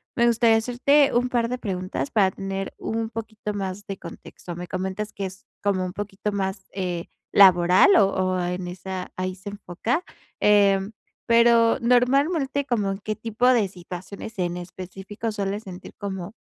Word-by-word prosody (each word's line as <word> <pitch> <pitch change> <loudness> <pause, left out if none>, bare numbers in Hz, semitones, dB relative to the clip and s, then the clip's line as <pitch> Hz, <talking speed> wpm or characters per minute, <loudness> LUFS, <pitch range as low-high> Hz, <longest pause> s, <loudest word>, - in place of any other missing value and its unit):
me 235 - +3
gustaría 230 -1 +4
hacerte 270 +5 +3
un 245 +1 +2
par 235 -1 +1
de 250 - -2
preguntas 185 - -3
para 195 -4 +3
tener 195 0 -4
un 225 0 -3
poquito 220 -2 -5
más 195 0 -4
de 195 - -5
contexto. 175 -2 -10
Me 180 0 -6
comentas 190 +3 -4
que 200 - -4
es 190 +1 -13 0.2
como 190 -2 +1
un 180 - -5
poquito 205 0 -4
más, 190 -1 -3
eh, 180 -3 -3 0.3
laboral 185 0 +7
o-o 185 -2 +2
en 180 0 -3
esa 185 +1 -6
ahí 185 0 -2
se 195 +2 -8
enfoca, 205 - -2 0.4
em, 200 -1 +4 0.4
pero 235 0 +5
normalmente, 275 +4 +2
¿como 210 -7 0
en 195 - -3
qué 215 +1 -3
tipo 225 +2 0
de 235 -6 +4
situaciones 185 +3 -9
en 175 -1 -1
específico 190 +5 -6
sueles 205 0 -3
sentir 185 -3 -10
como 195 0 -5
200 Hz, 160 wpm, -24 LUFS, 185-230 Hz, 0.4 s, laboral